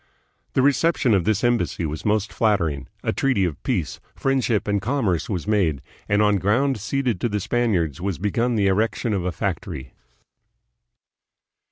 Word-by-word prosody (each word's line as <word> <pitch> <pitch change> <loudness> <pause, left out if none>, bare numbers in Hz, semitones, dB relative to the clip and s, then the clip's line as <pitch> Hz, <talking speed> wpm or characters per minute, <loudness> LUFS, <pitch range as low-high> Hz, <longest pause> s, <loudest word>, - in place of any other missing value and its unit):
The 130 - +2
reception 145 -3 +3
of 95 -4 +2
this 110 0 +1
embassy 115 -8 +1
was 75 +1 -5
most 105 -1 +1
flattering; 85 - 0 0.2
a - - 0
treaty 125 -9 +1
of 80 -6 -4
peace, 95 - -2 0.2
friend 135 -1 +1
ship, 110 -4 0
and 100 -1 +1
commerce 110 - 0
was 90 -6 -2
made, 95 -9 +1 0.3
and 105 +1 +3
on 105 -1 +3
ground 115 +7 +1
ceded 125 -1 -1
to 120 - +1
the 105 -1 -1
Spaniards 95 - 0
was 95 -2 -2
begun 115 +5 0
the 105 -2 +2
erection 110 +3 +1
of 95 -3 -1
a 90 - 0
factory. 80 -7 -4
105 Hz, 165 wpm, -23 LUFS, 90-120 Hz, 0.3 s, reception